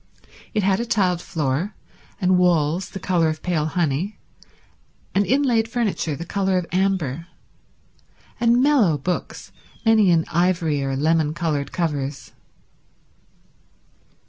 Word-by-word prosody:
It 210 - +1
had 190 0 +2
a 235 - -2
tiled 185 -6 +1
floor, 160 +6 -2 0.4
and 185 -1 +3
walls 175 0 +2
the 195 - -7
colour 175 -3 +1
of 155 0 -5
pale 160 -4 0
honey, 170 +4 -1 1.0
and 200 +1 +2
inlaid 250 -5 +2
furniture 220 -10 -1
the 170 - -7
colour 190 0 0
of 180 - -1
amber, 175 -5 -1 1.1
and 235 +2 +3
mellow 245 - +3
books, 175 +6 -4 0.3
many 220 -3 +5
in 165 -2 +3
ivory 170 -4 +1
or 135 0 -2
lemon 155 +2 +1
coloured 150 -5 -2
covers. 145 -5 -3
175 Hz, 120 wpm, -22 LUFS, 155-195 Hz, 1.1 s, many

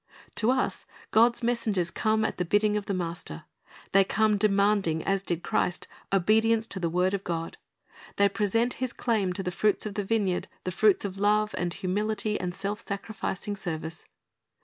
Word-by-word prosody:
To 225 - +4
us 260 0 0 0.2
God's 235 +2 +4
messengers 215 -7 0
come 220 +2 +1
at - - -2
the 180 - 0
bidding 210 +4 +2
of 210 -1 -2
the 200 - -1
Master. 170 - -5 0.5
They 195 0 +6
come 215 +2 +2
demanding, 200 -5 +2
as 195 -1 0
did 175 -3 -3
Christ, 180 - -1 0.2
obedience 220 +4 +3
to 195 - -2
the 170 -2 0
word 180 +3 +1
of 200 -1 -2
God. 165 -1 -4 0.6
They 200 - +4
present 210 +5 0
His 255 -2 -1
claim 215 -6 0
to 195 - -4
the 180 - -2
fruits 210 +4 +1
of 210 - -4
the 205 - -2
vineyard, 195 -3 0 0.2
the 185 - -2
fruits 205 +2 +3
of 195 -1 -5
love, 210 +1 +2
and 175 -1 -1
humility, 210 +4 -1
and 180 -1 -3
self 200 +2 -3
sacrificing 205 -1 -4
service. 165 -3 -5
200 Hz, 175 wpm, -27 LUFS, 180-215 Hz, 0.6 s, They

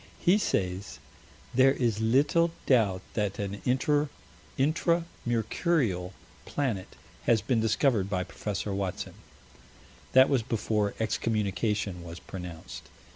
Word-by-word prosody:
He 190 +5 +4
says: 95 - -1 0.6
"There 130 +2 +6
is 115 -5 0
little 145 +9 +3 0.2
doubt 105 -8 +3
that 105 -3 -1
an 100 0 -4
Intra 145 +3 +2 1.2
Mercurial 115 - 0 0.3
planet 115 -10 -3 0.3
has 115 -2 +4
been 115 +1 +1
discovered 110 -2 +2
by 90 -2 0
Prof. 95 +3 -4
Watson." 100 -2 -3 1.0
That 130 +1 +8
was 135 -4 +2
before 110 -3 -1
excommunication 105 -4 -1
was 85 0 -8
pronounced. 90 -3 -8
110 Hz, 105 wpm, -29 LUFS, 95-130 Hz, 1.2 s, That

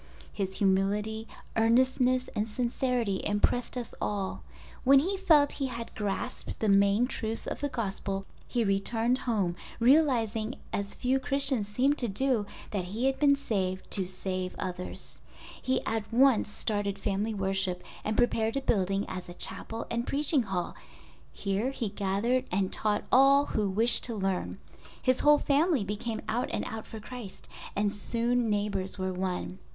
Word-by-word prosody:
His 190 -2 -3
humility, 205 +3 +1 0.3
earnestness, 255 +2 +3
and 210 +1 0
sincerity 240 -3 -1
impressed 220 +5 +1
us 240 -2 -5
all. 200 -2 -2 0.4
When 275 +2 +7
he 360 +9 +2
felt 320 -7 +4
he 275 - -2
had 235 -2 -6
grasped 205 -2 -4
the 220 - +1
main 200 +3 +4
truths 225 -3 -4
of - - -4
the 285 - -1
Gospel 195 -4 -3 0.2
he 240 -2 0
returned 225 +5 +1
home 195 -6 +1 0.2
realizing 235 -4 +3 0.2
as 200 0 -2
few 260 +1 +1
Christians 270 -6 +1
seem 255 +7 +2
to 245 - 0
do, 230 0 0 0.2
that 195 -4 -2
he 215 +8 -2
had 270 0 +1
been 285 -1 +5
saved 190 -9 -2
to 190 -3 -1
save 185 0 -4
others. 180 -1 -6 0.4
He 260 - 0
at 220 -1 -2
once 250 -2 +4
started 205 -2 -2
family 205 +2 -1
worship, 190 -2 -1 0.2
and 215 0 -1
prepared 225 0 +2
a - - 0
building 195 -4 +1
as 185 -1 -6
a 175 - -8
chapel 225 +4 -2
and 235 +1 -1
preaching 290 0 +3
hall—here 180 - -4
he 245 -5 -3
gathered 205 +7 0
and 190 +1 0
taught 210 -1 0
all 275 +2 +6
who 210 -6 -1
wished 225 +5 +4
to 235 - -3
learn. 195 -2 -2 0.4
His 255 -1 +2
whole 295 0 +6
family 290 - +2
became 210 +3 -3
out 240 +3 -1
and - - -2
out 220 -1 -6
for 220 - -8
Christ 225 -2 -9 0.3
and 205 0 +1
soon 235 +3 +1
neighbors 205 -2 -1
were 185 -1 -2
won. 185 0 -3
220 Hz, 155 wpm, -29 LUFS, 195-250 Hz, 0.4 s, When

